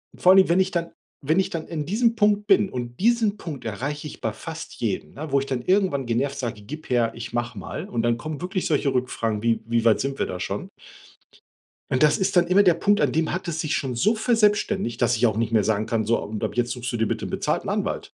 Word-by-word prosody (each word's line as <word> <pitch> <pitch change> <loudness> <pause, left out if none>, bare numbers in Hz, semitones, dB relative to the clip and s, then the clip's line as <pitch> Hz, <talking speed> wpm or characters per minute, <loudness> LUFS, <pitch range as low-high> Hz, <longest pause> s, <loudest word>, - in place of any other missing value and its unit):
vor 180 - +5
allem, 190 -2 +6
wenn 175 +2 +4
ich 190 0 +2
dann 170 -1 -2 0.3
wenn 155 +6 +1
ich 190 0 +1
dann 165 -3 -4
in 155 -3 -4
diesem 230 +4 +2
Punkt 210 -1 +2
bin 200 -1 +4
und 120 -3 -6
diesen 225 -1 +2
Punkt 150 -11 -7
erreiche 140 +8 -4
ich 150 - -9
bei - - -1
fast - - -8
jedem, 75 - -3
ne, 150 0 -6
wo 140 - +4
ich 135 - -4
dann 130 -3 -2
irgendwann 185 -8 +1
genervt 135 +4 -1
sage: 115 -5 -4
„Gib 150 +9 -9
her, 120 -2 +2
ich 115 0 -7
mach 120 0 -2
mal“ - - -6
und 115 -1 -1
dann 120 0 +2
kommen 155 +3 -6
wirklich 185 +1 -2
solche 145 -3 +1
Rückfragen 115 -4 -1
wie: 115 0 +1
„Wie 115 0 0
weit 115 -2 +4
sind 135 0 -3
wir - - 0
da 90 - -5
schon?“ - - -4 1.2
Und 130 +2 +2
das 150 -1 +5
ist 190 0 0
dann 175 -1 +4
immer 190 +3 +5
der 180 -3 +5
Punkt, 205 +5 +2
an 145 -4 +2
dem 160 0 +1
hat 185 0 -4
es 160 -1 -2
sich 155 - -1
schon 130 -4 -2
so 205 - +3
verselbstständigt, 210 - +1
dass 120 - +3
ich 115 - +2
auch 110 -2 +1
nicht 115 0 -1
mehr 110 -2 +4
sagen 110 0 0
kann: 110 -2 -1
„So, 115 +1 +2
und 105 0 -5
ab - - -2
jetzt 120 0 0
suchst 125 0 -4
du 120 - -2
dir 110 -1 +1
bitte - - -3
'nen - - -6
bezahlten - - -1
Anwalt.“ - - -2
145 Hz, 260 wpm, -24 LUFS, 120-185 Hz, 1.2 s, allem